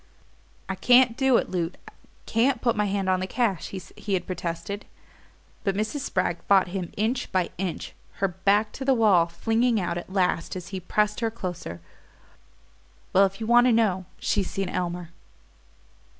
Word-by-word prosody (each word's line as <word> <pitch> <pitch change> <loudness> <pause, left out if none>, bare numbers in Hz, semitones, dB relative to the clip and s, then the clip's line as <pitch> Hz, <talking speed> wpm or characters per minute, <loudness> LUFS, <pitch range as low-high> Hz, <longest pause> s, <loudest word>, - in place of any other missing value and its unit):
"I 190 - -2
can't 245 +5 +5
do 265 -2 +4
it, - - -2
Loot 175 -1 -2 0.5
can't 245 +3 +2
put 235 -1 +1
my 210 0 +1
hand 195 -1 -1
on 185 0 +2
the 185 - -3
cash," 210 -6 0
he 195 +2 -6
had 180 - -2
protested; 185 +3 -4 0.8
but 195 -2 0
Mrs. 215 +8 -2
Spragg 180 -8 -1
fought 190 -2 +5
him 180 -2 -4
inch 230 +5 -1
by 185 -2 0
inch, 185 -3 -4 0.2
her 195 - 0
back 205 +4 +1
to 270 - -6
the 265 0 +3
wall 200 -7 +4
flinging 225 +6 +1
out 175 -2 -2
at 175 - -11
last, 185 -3 0
as 180 -1 -7
he 190 -1 -4
pressed 210 +3 0
her 230 -1 0
closer: 180 - -6 1.3
"Well, 195 +1 +6
if 195 +2 -11
you 225 - -3
want 240 +2 +5
to - - +5
know, 205 -5 +2
she's 200 -3 0
seen 195 -2 -2
Elmer." 175 -2 -3
195 Hz, 170 wpm, -26 LUFS, 180-225 Hz, 1.3 s, Well